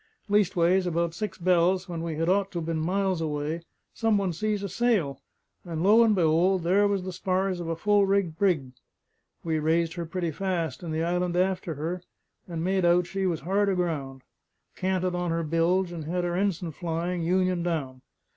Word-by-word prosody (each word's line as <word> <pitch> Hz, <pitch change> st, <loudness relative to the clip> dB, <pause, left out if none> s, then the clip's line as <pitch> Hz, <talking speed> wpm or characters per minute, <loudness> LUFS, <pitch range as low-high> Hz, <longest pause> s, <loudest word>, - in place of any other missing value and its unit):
Leastways, 190 Hz, -3 st, +3 dB
about 170 Hz, -1 st, 0 dB
six 210 Hz, +1 st, -4 dB
bells, 180 Hz, +1 st, +2 dB
when 170 Hz, -2 st, -5 dB
we 165 Hz, -1 st, -3 dB
had 165 Hz, +2 st, -1 dB
ought 195 Hz, +2 st, +2 dB
to 175 Hz, -, -3 dB
been 165 Hz, -1 st, -2 dB
miles 185 Hz, +1 st, 0 dB
away, 155 Hz, +1 st, -2 dB, 0.3 s
some 225 Hz, -2 st, +2 dB
one 195 Hz, -3 st, 0 dB
sees 210 Hz, +3 st, -1 dB
a -, -, -1 dB
sail, 195 Hz, -, 0 dB, 0.4 s
and 165 Hz, -2 st, -4 dB
lo 215 Hz, +4 st, +6 dB
and 220 Hz, -2 st, +3 dB
be'old, 175 Hz, +2 st, +3 dB
there 195 Hz, +4 st, +3 dB
was 200 Hz, -2 st, -1 dB
the 185 Hz, 0 st, -5 dB
spars 185 Hz, 0 st, -1 dB
of 170 Hz, -, -5 dB
a 165 Hz, -, -1 dB
full 205 Hz, +3 st, +3 dB
rigged 195 Hz, -5 st, +1 dB
brig! 165 Hz, -9 st, +1 dB, 0.7 s
We 160 Hz, -2 st, 0 dB
raised 165 Hz, +2 st, +1 dB
her 170 Hz, -2 st, -5 dB
pretty 170 Hz, 0 st, -2 dB
fast, 180 Hz, 0 st, -2 dB
and 170 Hz, -3 st, -5 dB
the 160 Hz, +1 st, -1 dB
island 175 Hz, +1 st, 0 dB
after 180 Hz, -3 st, 0 dB
her; 165 Hz, +5 st, -3 dB, 0.5 s
and 165 Hz, -2 st, -4 dB
made 190 Hz, +1 st, +1 dB
out 175 Hz, +1 st, +4 dB
she 190 Hz, +1 st, -2 dB
was 170 Hz, -3 st, -1 dB
hard 200 Hz, +5 st, +1 dB
aground, 150 Hz, -8 st, -2 dB, 0.5 s
canted 185 Hz, -1 st, -1 dB
on 175 Hz, 0 st, -1 dB
her 165 Hz, 0 st, 0 dB
bilge, 170 Hz, +3 st, +1 dB
and 165 Hz, -3 st, -6 dB
had 175 Hz, +3 st, -1 dB
her 175 Hz, 0 st, -1 dB
ens'n 180 Hz, -4 st, -1 dB
flying, 170 Hz, +2 st, -2 dB
union 185 Hz, +1 st, +1 dB
down. 145 Hz, -7 st, -3 dB
175 Hz, 190 wpm, -27 LUFS, 165-190 Hz, 0.7 s, lo